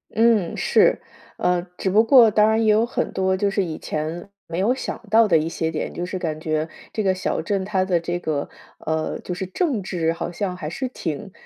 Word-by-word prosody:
嗯， 225 -6 +3
是。 - - +3 0.4
呃， 180 -1 +1 0.2
只 190 - -1
不 215 +4 +5
过， 230 -3 +7
当 210 +1 +4
然 220 0 +2
也 215 - +5
有 220 +2 +3
很 240 - -2
多 190 0 +1
就 200 +1 +1
是 195 0 0
以 160 -3 -4
前 160 +5 -4 0.2
没 165 +1 -5
有 225 +6 +3
想 265 - -5
到 225 0 +5
的 165 -4 +4
一 155 +1 0
些 160 -1 -2
点， 155 - -4
就 175 - -4
是 185 +1 -4
感 155 -3 -3
觉 155 0 -1 0.2
这 215 - -2
个 190 -1 +3
小 185 - -2
镇 195 +2 -1
它 190 -2 0
的 175 -3 +1
这 175 +1 -3
个， 155 -4 -2 0.3
呃， 160 0 -2
就 180 - -5
是 190 +1 -4
政 245 - -1
治 165 -3 -1
好 170 - -4
像 180 0 -3
还 155 -4 -5
是 260 +8 -4
挺 190 - -5
185 Hz, 240 characters per minute, -22 LUFS, 165-215 Hz, 0.4 s, 过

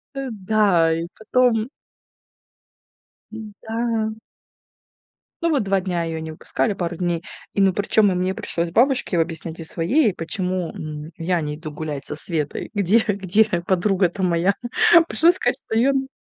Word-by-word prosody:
Э, 270 -1 -3
да, 195 -5 +2
и 165 +1 -2
потом 225 0 +2 1.6
Да. 220 +1 -3 1.3
Ну 335 - +2
вот 285 -7 +2
2 195 -1 +1
дня 180 -2 -2
ее 165 -1 -4
не 160 0 -6
выпускали, 205 +6 -1
пару 175 -3 -3
дней. 175 -1 -1 0.3
И, 200 - +1
ну, 190 -1 +4
причем 205 +1 +3
и - - -1
мне 185 +1 0
пришлось 170 -2 -3
бабушке 245 -4 +2
объяснять, 165 0 -3
и - - -5
своей, 185 - +2
и - - -4
почему, 180 +1 -2
м, 155 +1 -7
я 170 +1 0
не 150 -1 -3
иду 155 0 -8
гулять 150 -2 -5
со - - -5
Светой, 155 -2 -3
где 205 +2 +3
где 200 +1 +2 0.2
подруга-то 190 0 +1
моя. 175 +2 +2 0.6
Пришлось 340 +2 +4
сказать, - - 0
что - - -2
ее 240 +4 +4
н 270 -1 -1
185 Hz, 155 wpm, -22 LUFS, 165-220 Hz, 1.6 s, ну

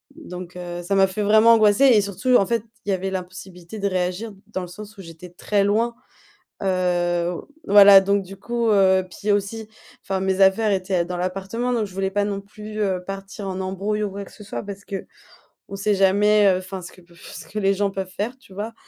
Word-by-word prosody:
Donc, 180 - -9
heu, 175 0 -6
ça 195 +3 -2
m'a 195 0 +5
fait 190 +3 -4
vraiment 220 +3 +6
angoisser 215 +3 +4
et 235 -6 +6
surtout 200 +6 0
en 195 - +2
fait, 235 -1 0 0.2
il - - -5
y - - +2
avait 190 +1 -2
l'impossibilité 185 +1 -8
de 200 - 0
réagir 185 +4 -2 0.2
dans 200 -3 -4
le 180 - -6
sens 210 +4 -11
où - - -9
j'étais 165 +1 -11
très 200 +3 0
loin, 225 +4 +1 0.7
heu, 175 -2 0 0.4
voilà, 200 -1 +9
donc 200 +1 +1
du 195 +2 -11
coup, 235 +2 -2
heu, 190 -2 +4
puis 210 +3 -4
aussi, 210 +2 -2 0.3
enfin 195 -1 -2
mes 190 0 0
affaires 195 +3 +4
étaient, 185 -2 0
heu, - - -4
dans 180 - -4
l'appartement, 195 +7 -3
donc 230 -3 0
je 190 - -14
voulais 190 0 -1
pas 205 +1 0
non 200 -1 -3
plus, 210 +1 -9
heu, 190 -3 0
partir 195 +1 -7
en 190 0 -4
embrouille 195 +3 -2
ou 205 - -3
quoi 200 +1 -6
que - - -16
ce - - -14
soit 210 - -5
parce 200 0 -8
qu'on 195 - -9 0.5
sait 200 +1 0
jamais, 205 +2 +4
heu, 185 -1 +3
enfin 185 0 -7
ce 175 - -10
que 185 - -17
peut 170 0 -22
f - - -13
ce - - -10
que 210 - -5
les 195 -1 +2
gens 200 0 0
peuvent 190 -1 -5
faire, 215 +7 -4
tu 230 -7 -18
vois? 205 +3 -4
Donc 230 - -13
195 Hz, 230 wpm, -22 LUFS, 185-210 Hz, 0.7 s, voilà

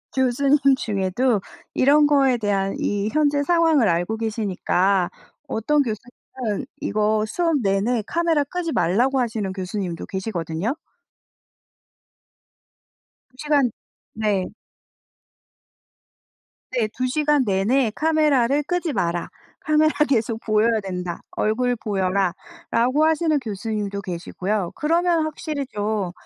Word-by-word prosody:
교수님 270 +3 +3 0.2
중에도 205 +2 0 0.3
이런 290 +3 +5
거에 275 -4 +3
대한 195 -2 -1
이 205 +1 -1
현재 290 -1 +2
상황을 320 - +3
알고 175 +6 0
계시니까 200 -4 0 0.4
어떤 290 +7 +1
교수님은 235 -1 -5 0.2
이거 215 +1 +1
수업 330 +5 +1
내내 210 +4 +1
카메라 335 -1 +1
끄지 335 +3 -4
말라고 240 +10 +2
하시는 220 -5 -1
교수님도 185 -2 -4
계시거든요. 190 - -3 2.5
2 255 - -29
시간 285 -5 +2 0.4
네. 210 -4 0 2.3
네. 235 -4 0
"2 255 - 0
시간 295 +1 +2
내내 215 +5 +2
카메라를 295 -4 +2
끄지 355 +1 -1
마라. 170 -4 -1 0.3
카메라 310 0 +3 0.2
계속 230 -3 0
보여야 220 +1 +2
된다. 180 -3 -5
얼굴 245 +3 0
보여라."라고 220 - 0
하시는 315 -1 +2
교수님도 210 -3 -4
계시고요. 185 +1 -3
그러면 335 +1 +2
확실히 305 -2 -4
좀 205 -5 -2
230 Hz, 245 characters per minute, -22 LUFS, 200-290 Hz, 2.5 s, 이런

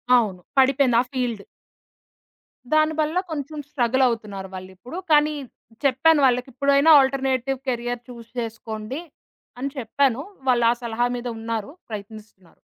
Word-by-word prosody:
అవును. 205 -7 +1 0.2
పడిపేంద 265 -2 +4
ఆ - - -2
ఫీల్డ్. 240 -6 -2 1.3
దానివల్ల 310 +1 +2
కొంచెం 300 0 -5
స్ట్రగలవుతున్నారు. 235 -7 0
వాళిప్పుడు 185 - -9
కానీ 300 0 +5 0.5
చెప్పాను 290 +4 +4
వాళ్ళకిప్పుడైనా 270 +4 +2
ఆల్టర్నేటివ్ 265 -1 0
క్యారియర్ 240 -1 -2
చూస్ 235 -1 -11
చేసుకోండి 225 +3 -5 0.6
అని 275 +2 -2
చెప్పాను. 260 +1 +1 0.3
వాళ్ళ 240 -1 +4
ఆ - - +3
సలహా 235 +1 0
మీద 245 0 -5
ఉన్నారు 225 +1 -4 0.2
ప్రయత్నిస్తున్నారు. 210 -3 -10
245 Hz, 110 wpm, -23 LUFS, 225-275 Hz, 1.3 s, కానీ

